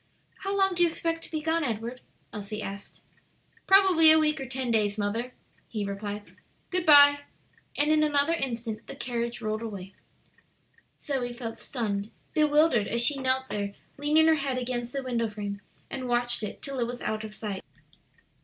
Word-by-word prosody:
"How 395 +1 -2
long 385 -1 +3
do 350 - -2
you 345 - +5
expect 330 0 -3
to - - -12
be 310 -1 -2
gone, 325 +1 +1
Edward?" 235 0 -4 0.3
Elsie 210 0 -5
asked. 200 +1 -8 0.6
"Probably 380 -5 +7
a 315 - +8
week 305 -2 +1
or 265 - -5
ten 260 -1 -2
days, 210 -2 +1
mother," 220 +4 -2 0.4
he 210 -3 -3
replied. 205 +1 -6 0.4
"Good 365 -2 -1
by," 285 -1 +8 0.6
and 295 +1 +3
in 310 0 +4
another 295 +1 +2
instant 235 -7 -3
the - - -7
carriage 240 -3 -3
rolled 215 0 -2
away. 200 -4 -7 1.1
Zoe 255 -4 -3
felt 235 -2 -6
stunned, 210 -5 -3 0.2
bewildered, 300 -7 +3
as 235 +1 +2
she 285 0 +2
knelt 260 0 0
there 200 -1 -3 0.2
leaning 300 +2 +4
her 320 - +6
head 275 -4 -1
against 245 -1 -3
the 275 0 -3
window 235 -3 -1
frame 205 -1 -5 0.3
and 260 -2 -5
watched 240 0 +2
it 210 - -6
till 275 -2 -4
it 235 - 0
was 245 0 -6
out 215 0 -2
of 215 -1 -8
sight. 205 -3 -5
245 Hz, 175 wpm, -27 LUFS, 215-300 Hz, 1.1 s, a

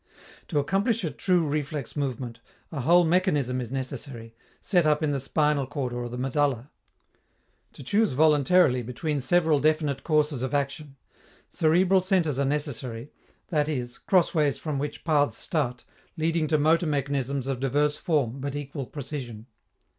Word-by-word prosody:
To 155 - -2
accomplish 195 - +1
a 160 - -1
true 175 +4 +1
reflex 145 -2 -3
movement, 125 -4 -3 0.3
a 145 -5 -3
whole 175 +6 +5
mechanism 150 -8 +1
is 120 -1 -6
necessary, 130 -3 -6 0.3
set 175 -5 +2
up 150 +1 +2
in 150 - +1
the 140 - -1
spinal 145 0 +1
cord 130 -3 -3
or 120 0 -4
the 125 - -6
medulla. 135 0 -1 1.0
To - - -11
choose 205 - +1
voluntarily 150 -1 +4
between 145 +5 -3
several 160 +2 +2
definite 150 -2 +1
courses 150 -4 +1
of 130 +2 -2
action, 140 0 -3 0.6
cerebral 180 +4 +3
centres 180 -7 +1
are 140 - +2
necessary, 135 -3 -3 0.4
that 150 -3 +1
is, 125 -5 -4
crossways 160 -6 +2
from 150 -4 -3
which 145 +1 -5
paths 145 -7 +2
start, 125 -4 -2 0.3
leading 160 0 0
to 155 0 +2
motor 160 +3 +3
mechanisms 140 -2 -1
of 135 -2 -2
diverse 145 +3 +1
form 140 -6 0
but 140 +1 -4
equal 140 -2 -5
precision. 130 -6 -7
145 Hz, 150 wpm, -26 LUFS, 130-155 Hz, 1.0 s, whole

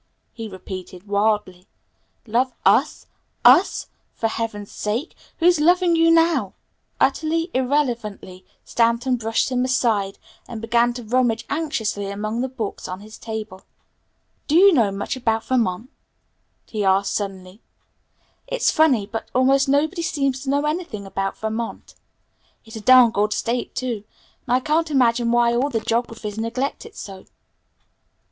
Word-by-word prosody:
he 225 -2 -7
repeated 185 0 -9
wildly. 205 -3 0 0.6
"Love 245 +3 0
us? - - +3 0.4
us? 270 +10 +5 0.3
For 225 - -1
heaven's 215 -3 -4
sake, 220 +9 -3 0.2
who's 345 -1 +4
loving 350 +2 +4
you 330 0 +4
now?" 330 0 +3 0.4
Utterly 330 +2 +1
irrelevantly, 240 -8 -2 0.2
Stanton 235 +2 +1
brushed 225 +1 0
him 250 0 +1
aside, 225 -6 0 0.3
and 230 - -7
began 235 +2 +2
to 245 0 -7
rummage 230 0 +1
anxiously 225 -10 -2
among 215 +3 -3
the 260 - -2
books 230 -5 -5
on 185 +2 -6
his 215 +1 -12
table. 220 -4 -6 0.9
"Do 305 - +1
you 390 +2 +7
know 230 -9 +3
much 200 +6 -3
about 225 -3 0
Vermont?" 235 -1 -1 0.7
he 215 -2 -3
asked 195 +1 +2
suddenly. 195 0 -5 0.9
"It's - - +1
funny, 275 -10 +3
but 225 +2 -6
almost 270 +2 +3
nobody 310 +6 +1
seems 275 -5 -1
to 270 - -5
know 285 +2 +1
anything 300 - -3
about 195 0 -3
Vermont. 220 +1 -5 0.7
It's 225 +1 -12
a 220 - -6
darned 250 0 +6
good 210 0 +1
state, 240 +3 -2
too, 240 -5 -3 0.4
and 245 - +3
I 255 - +1
can't 315 +3 +1
imagine 240 -4 +2
why 240 0 +3
all 255 +4 +1
the 230 -5 -1
geographies 225 -2 -3
neglect 245 +5 -3
it - - -17
so." 190 -2 -9
235 Hz, 140 wpm, -22 LUFS, 210-270 Hz, 0.9 s, you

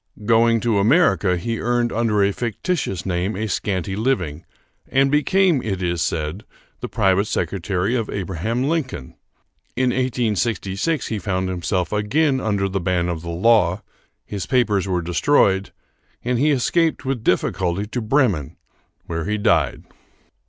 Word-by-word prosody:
Going 115 +1 +4
to 115 -4 +1
America, 105 - +3
he 115 +6 -3
earned 120 0 0
under 110 -3 +2
a 100 - +2
fictitious 120 - -2
name 95 +3 -1
a 110 +3 -2
scanty 95 -1 -2
living, 95 - -1 0.4
and 135 +1 +2
became, 170 +1 +3
it 95 -5 -3
is 85 -2 -1
said, 80 +7 -2 0.4
the - - -5
private 100 -2 +2
secretary 95 +2 -1
of 115 -4 -1
Abraham 100 +6 -2
Lincoln. 135 - -2 0.6
In 125 0 +2
1866 120 - -1
he 110 - -2
found 95 -1 -2
himself 90 +1 -2
again 130 +7 +1
under 100 -3 0
the 95 0 -2
ban 90 0 0
of 85 -2 -3
the 85 - -7
law, 95 +1 +2 0.4
his 100 -4 -5
papers 105 -3 +1
were 90 -2 -1
destroyed, 95 - +2 0.5
and 125 -1 0
he 150 +3 +3
escaped 155 +4 +1
with 130 -4 -2
difficulty 90 0 0
to 120 +3 -4
Bremen, 110 - +1 0.5
where 85 0 -4
he 105 +2 -1
died. 80 -9 +1
105 Hz, 145 wpm, -21 LUFS, 90-120 Hz, 0.6 s, Going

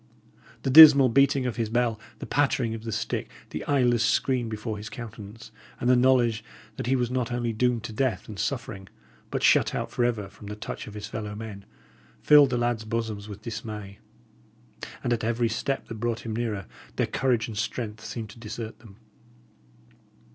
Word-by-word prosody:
The 135 - 0
dismal 145 -3 +10
beating 140 +1 +3
of 125 -2 -3
his 115 -2 -1
bell, 120 -1 0 0.2
the - - -7
pattering 135 -5 +1
of 115 0 -7
the 115 - -3
stick, 110 - -3 0.2
the - - -4
eyeless 125 -5 +2
screen 120 0 +1
before 110 0 -4
his 105 +1 -7
countenance, 110 -1 -9 0.3
and 120 - -2
the 125 - +6
knowledge 120 -3 +3 0.3
that - - -4
he 130 - +3
was 125 -2 -1
not 125 -1 -1
only 120 -1 -1
doomed 120 0 +1
to 110 - -6
death 130 +2 -1
and 105 -3 -8
suffering, 110 -7 -3 0.4
but - - -3
shut - - +4
out - - -3
for 120 - 0
ever 115 -5 0
from 100 +1 -13
the 105 - -5
touch 105 - -7
of 105 - -10
his 105 0 -6
fellow 105 -1 -6
men, 105 -2 -8 0.6
filled 145 -2 +7
the 125 - 0
lads' 120 -2 0
bosoms 110 -2 -4
with 105 +1 -9
dismay; 105 -3 -7 1.0
and 120 -2 +1
at 115 - -2
every 115 +1 +1
step 135 +5 -2
that 115 - -7
brought 120 0 -2
him 110 -2 -5
nearer, 110 -4 -2 0.3
their - - +1
courage 125 -4 0
and 110 -3 -5
strength 110 -1 -4
seemed 110 -1 -6
to 115 - -15
desert 110 0 -7
them. 110 -4 -15
115 Hz, 190 wpm, -26 LUFS, 110-125 Hz, 1.0 s, dismal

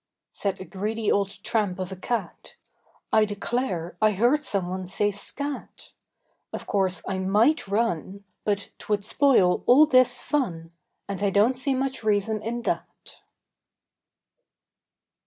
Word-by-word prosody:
Said 200 -2 -2
a 185 - -7
greedy 215 +3 -2
old 200 0 -1
tramp 205 -5 0
of 185 0 -4
a - - -5
cat: 235 +5 -4 0.6
"I 220 - +6
declare, 205 -4 -2
I 215 -1 +4
heard 245 +9 +2
someone 185 -4 -2
say 205 +3 0
'scat!' 280 +8 -5 0.6
Of - - -6
course 190 -3 0
I 190 -1 -2
might 210 +10 +2
run; 200 -2 -1 0.2
But 205 -1 -1
t'would 205 -1 -1
spoil 235 -8 +3
all 280 +5 +8
this 255 -3 +4
fun, 170 - -2 0.4
And 200 -1 -5
I 200 - +2
don't 205 +6 +3
see 265 +1 0
much 265 -1 -2
reason 215 0 +1
in 235 +2 -4
that." - - -5
205 Hz, 135 wpm, -25 LUFS, 190-240 Hz, 0.6 s, all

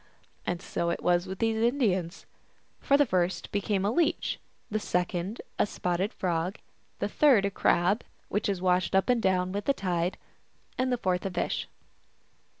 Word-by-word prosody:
And 175 +1 -2
so 170 -2 -1
it 170 - -2
was 175 +1 +2
with 190 +1 -5
these 225 +1 +1
Indians. 200 -8 +1 0.5
For 280 - +3
the 290 - +5
first 180 -4 0
became 200 -1 0
a 205 - +2
Leech, 335 +5 +1 0.3
the 215 - 0
second 180 +2 -2 0.2
a - - +5
Sp9tted 180 +1 -1
Frog, 175 0 -1 0.4
the - - -1
third 260 -10 +4
a 200 - 0
Crab, 195 +3 +2 0.2
which 205 +1 -1
is 190 -2 -2
washed 185 0 +2
up 190 +3 +3
and 245 -2 +3
down 185 -2 +1
with 205 +1 -3
the 275 - +3
tide, 180 -3 -1 0.6
and 255 0 0
the 250 - +2
fourth 185 -5 0
a 195 - -1
Fish. 180 - -2
190 Hz, 170 wpm, -28 LUFS, 180-220 Hz, 0.6 s, the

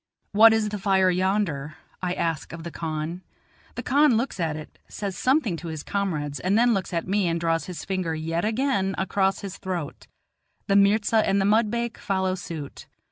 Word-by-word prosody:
"What 220 +2 +8
is 220 -1 +1
the 210 0 -4
fire 190 -1 +3
yonder?" 180 -6 0 0.3
I 180 -1 -1
ask 165 -2 -2
of 165 -1 -7
the 170 - -6
khan. 160 +2 -4 0.5
The - - -4
khan 285 -2 +4
looks 235 -4 -2
at 160 -3 0
it, 155 0 -10
says 200 -3 -5
something 255 - +1
to 170 - -8
his 160 -2 -5
comrades, 155 -8 -2
and 190 +3 +1
then 240 +1 +4
looks 195 -3 -2
at 170 0 -2
me 195 -1 +1
and 170 0 0
draws 165 -1 0
his 180 -2 -6
finger 185 -4 -2
yet 165 +2 -2
again 215 -4 0
across 190 +1 0
his 200 -1 -6
throat; 175 -6 -5 0.6
the 195 - +1
mirza 205 +2 +4
and 200 -2 +3
the 195 - +2
mudbake 230 +2 +1
follow 190 -1 0
suit. 165 -6 -7
190 Hz, 190 wpm, -25 LUFS, 165-210 Hz, 0.6 s, What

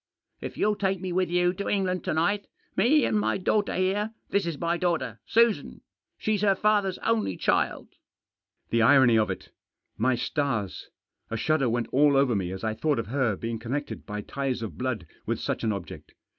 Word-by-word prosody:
If - - -7
you'll 210 0 +1
take 195 -2 0
me 185 0 -4
with 185 0 +1
you 180 0 +2
to 200 +2 -4
England 185 -3 0
to - - 0
night 200 +6 +1 0.2
— - - -41
me 260 +9 +4
and 215 - +1
my - - +1
daughter 205 +2 0
here; 205 +4 0 0.2
this 200 -3 +1
is 165 -4 -3
my 170 0 0
daughter, 155 - -1
Susan. 230 -1 +2 0.4
She's 215 -2 0
her 200 -2 +4
father's 205 -2 +2
only 100 -5 +1
child." - - 0 0.8
The 115 - +3
irony 120 -2 +6
of 110 - +1
it - - -5
f - - -35 0.5
My 125 +3 +3
stars! 120 - -2 0.4
A 115 - -2
shudder 145 0 +1
went 120 +1 -1
all 145 0 +4
over 135 -4 +3
me 95 -3 -1
as 95 +2 -6
I 110 -1 0
thought 150 +6 0
of 115 -2 -3
her 125 -5 +1
being 115 +2 -4
connected 135 +6 -4
by 105 0 -4
ties 130 +1 -3
of 100 -9 -6
blood 125 -8 -3 0.2
with - - -1
such - - -3
an 110 - +1
object. 100 -5 -7
145 Hz, 200 wpm, -27 LUFS, 115-190 Hz, 0.8 s, irony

